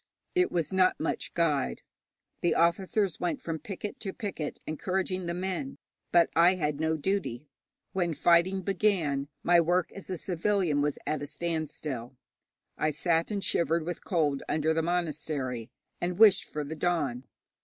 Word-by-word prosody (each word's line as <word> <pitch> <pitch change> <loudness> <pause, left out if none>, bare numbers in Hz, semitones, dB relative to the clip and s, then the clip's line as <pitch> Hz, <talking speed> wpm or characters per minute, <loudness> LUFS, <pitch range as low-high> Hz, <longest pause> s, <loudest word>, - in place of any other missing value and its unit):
It 365 0 +2
was 170 -1 -1
not 185 -1 +3
much 160 - -2
guide. 150 -5 +1 0.6
The 175 - +2
officers 185 +2 +2
went 175 - -1
from 165 -1 -4
picket 200 +5 -6
to 195 - -4
picket 195 -10 -4
encouraging 185 +3 -2
the 170 - -2
men, 190 +10 -3 0.3
but 170 -1 +5
I 175 +3 +6
had 150 -4 -1
no 160 0 +1
duty; 155 -6 -2 0.5
when 175 -4 0
fighting 175 +5 +3
began 175 -8 +1 0.2
my 175 0 +6
work 175 +2 +1
as 195 - -10
a 185 - -2
civilian 175 -4 +1
was 145 0 0
at 155 -2 -1
a 145 - -4
standstill. 150 -5 -3 0.6
I 155 - +2
sat 165 +2 +1
and 200 -2 -2
shivered 165 -1 +1
with 175 0 -5
cold 150 -7 +1
under 155 +1 +2
the 165 - +1
monastery, 150 -8 -2 0.3
and 175 0 -1
wished 210 -3 +7
for 150 - -4
the 150 +3 -5
dawn. 150 -7 -1
170 Hz, 155 wpm, -29 LUFS, 150-185 Hz, 0.6 s, wished